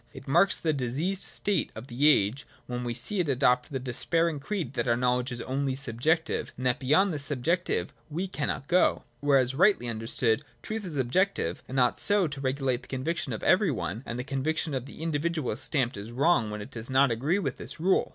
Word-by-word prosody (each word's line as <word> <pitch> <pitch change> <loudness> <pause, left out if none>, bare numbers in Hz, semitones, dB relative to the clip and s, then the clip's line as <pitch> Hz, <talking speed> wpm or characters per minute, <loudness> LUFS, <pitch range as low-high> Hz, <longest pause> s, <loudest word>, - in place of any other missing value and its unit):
It - - -11
marks 175 +8 +4
the 160 -2 0
diseased 145 +9 -1
state 205 -1 0
of 110 +3 -7
the 135 +4 +3
age 125 0 +2 0.2
when 125 0 -4
we 120 -1 -3
see 210 -2 -2
it 170 -5 +1
adopt 125 -1 +2
the 135 - -1
despairing 150 +5 0
creed 165 - -4
that 120 -2 -1
our 115 0 +3
knowledge 125 +1 +1
is 120 -1 -4
only 135 +1 -1
subjective, 140 +5 -1
and 130 - -5
that 125 +2 +2
beyond 160 +8 +3
this 145 -2 -2
subjective 155 +6 -1 0.2
we 175 +6 -3
cannot 145 -5 -3
go. 180 +1 +3 0.2
Whereas, 135 -3 +3
rightly 180 -4 +3
understood, 115 0 0 0.2
truth 215 -3 -4
is 155 -4 -5
objective, 130 - 0
and 130 +1 -2
ought 125 -1 +2
so 205 -2 +5
to 140 -2 -6
regulate 130 -2 0
the - - -15
conviction 135 +2 -2
of 110 - -4
everj'' 185 - +3
one, 110 +1 -4
that 120 - -4
the 125 - -3
conviction 150 +4 -1
of 130 0 -3
the 155 - -9
individual 160 -2 -1
is 105 - -4
stamped 130 -5 0
as 105 +3 -7
wrong 130 -3 +2
when 105 0 -5
it - - -12
does 115 +1 -7
not 135 0 +4
agree 140 - +1
with 200 - -2
this - - -8
rule. 185 +4 +2
135 Hz, 210 wpm, -28 LUFS, 125-165 Hz, 0.2 s, so